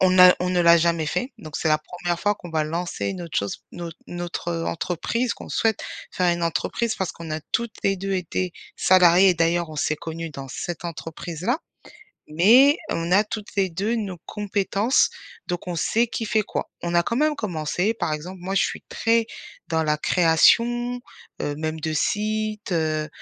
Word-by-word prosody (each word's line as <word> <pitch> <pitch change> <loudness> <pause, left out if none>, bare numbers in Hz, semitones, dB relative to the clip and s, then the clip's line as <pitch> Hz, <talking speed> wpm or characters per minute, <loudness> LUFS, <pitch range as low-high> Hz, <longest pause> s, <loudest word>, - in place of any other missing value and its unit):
on 185 - +5
n'a 180 0 +8
on 180 0 0
ne 180 -1 +2
l'a 170 0 +7
jamais 170 -1 +1
fait, 250 - -2
donc 155 -8 -7
c'est 160 - 0
la 155 - +4
1re 175 +2 -4
fois 205 +2 +1
qu'on 175 - -11
va 155 -1 0
lancer 170 +3 -3
une 185 -2 -3
autre 170 -2 -2
chose 100 0 -4
notre 170 -1 -7
notre, 175 0 -5
heu, 165 -1 -2
entreprise 205 +9 -1
qu'on - - -11
souhaite 225 -2 +1 0.3
faire 180 -1 +2
une 170 - -4
entreprise 225 +7 -1
parce 190 -3 -2
qu'on 165 -2 -9
a 155 - -2
toutes 235 -2 -1
les 195 - +3
2 195 +1 -2
été 180 0 -2 0.2
salariées 185 0 +6
et 185 - +4
d'ailleurs 170 0 +1
on 155 - -8
s'est 150 +1 +1
connues 165 +1 -6
dans 135 -1 -8
cette 175 +7 -5
entreprise-là. 170 - -3 0.7
Mais 240 - +6
on 165 +1 -2
a 200 +4 +5
toutes 210 0 -6
les 190 -2 +2
2 200 +8 -1
nos 195 -6 -4
compétences, 205 +3 +1 0.4
donc 175 0 -3
on 175 - -3
sait 230 +8 +2
qui 230 0 -4
fait 215 0 +2
quoi. - - -4
On 170 0 -3
a 170 - +5
quand 230 - -2
même 305 +3 +2
commencé, 180 - -1
par 170 -8 -2
exemple 175 +5 -5
moi 190 +2 -3
je - - +4
suis - - -3
très, 230 0 +2 0.4
dans 160 0 0
la 150 -1 +1
création, 235 +10 +3 0.4
heu, 145 0 -2
même 155 0 -3
de 160 0 -2
site, 215 +5 -1
heu, 155 -3 0
175 Hz, 195 wpm, -24 LUFS, 165-210 Hz, 0.7 s, n'a